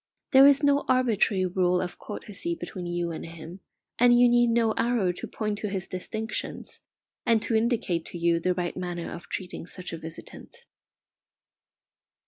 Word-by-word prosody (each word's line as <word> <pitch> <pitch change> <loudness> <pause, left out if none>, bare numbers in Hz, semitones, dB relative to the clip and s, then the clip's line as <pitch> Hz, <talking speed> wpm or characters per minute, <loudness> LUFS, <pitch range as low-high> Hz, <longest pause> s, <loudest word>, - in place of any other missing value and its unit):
There 270 0 +9
is 285 +1 +5
no 285 0 +4
arbitrary 225 -6 +2
rule 180 0 +2
of 180 - -4
courtesy 215 +10 -5
between 185 - -6
you 175 -1 -2
and 160 - -6
him, 165 +2 -9 0.4
and 240 0 +6
you 245 - +7
need 240 0 +4
no 230 -1 +3
arrow 230 -7 +1
to 180 - -7
point 210 -2 -3
to 210 - -3
his 190 -2 -3
distinctions, 220 +4 -5 0.4
and 230 -1 +3
to - - -2
indicate 220 -7 +1
to - - -7
you 170 0 +2
the 180 +2 0
right 175 -1 -2
manner 175 -2 -4
of 170 +1 -10
treating 180 -2 -5
such 180 -2 -5
a 165 - -5
visitant. 160 0 -10
190 Hz, 165 wpm, -27 LUFS, 175-235 Hz, 0.4 s, There